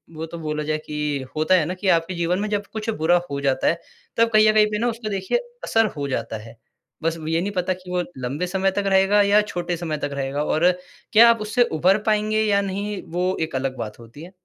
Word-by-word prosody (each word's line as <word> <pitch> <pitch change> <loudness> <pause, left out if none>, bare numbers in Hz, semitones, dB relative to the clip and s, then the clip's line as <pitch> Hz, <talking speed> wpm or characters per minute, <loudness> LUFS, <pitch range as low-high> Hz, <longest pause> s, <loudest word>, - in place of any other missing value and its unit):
वो 160 +1 -4
तो 170 - -8
बोला 150 -1 -3
जाए 155 0 -1
कि 150 -3 -2
होता 155 +4 +3
है 170 -4 +3
ना 180 - -3
कि 190 +2 -4
आपके 165 +3 -4
जीवन 175 +2 0
में 210 - -1
जब 205 -1 -1
कुछ 220 +1 -4
बुरा 175 +2 +4
हो 140 - -2
जाता 135 -1 +1
है, 170 - +1 0.4
तब 230 0 +4
कहीं 215 0 +6
अ, - - +4
कहीं 215 0 +5
पे 210 - -1
ना 240 - +1
उसका 225 -1 -5
देखिए 195 - 0 0.3
असर 225 0 +3
हो 140 -1 -2
जाता 115 -3 -3
है। 115 +1 -13 0.5
बस 165 0 0
ये 165 +1 +1
नहीं 200 - -2
पता 185 -1 0
कि 180 0 -13
वो 180 - +1 0.2
लंबे 135 +8 -3
समय 190 +1 +1
तक 200 +1 -2
रहेगा 195 +2 +4
या 205 +1 +5
छोटे 175 -4 -3
समय 160 -3 -3
तक 145 - -2
रहेगा, 140 +1 -2
और 175 +4 +3 0.4
क्या 235 +2 +8
आप 230 -2 -1
उससे 230 +4 +2 0.2
उभर 185 +5 +4
पाएँगे 215 0 +1
या 200 -2 +2
नहीं, 200 +1 -3
वो 180 +3 -2
एक 160 -3 -3
अलग 130 0 -3
बात 110 +1 -6
होती 120 +7 -12
है। 180 - -11
180 Hz, 245 wpm, -22 LUFS, 155-205 Hz, 0.5 s, क्या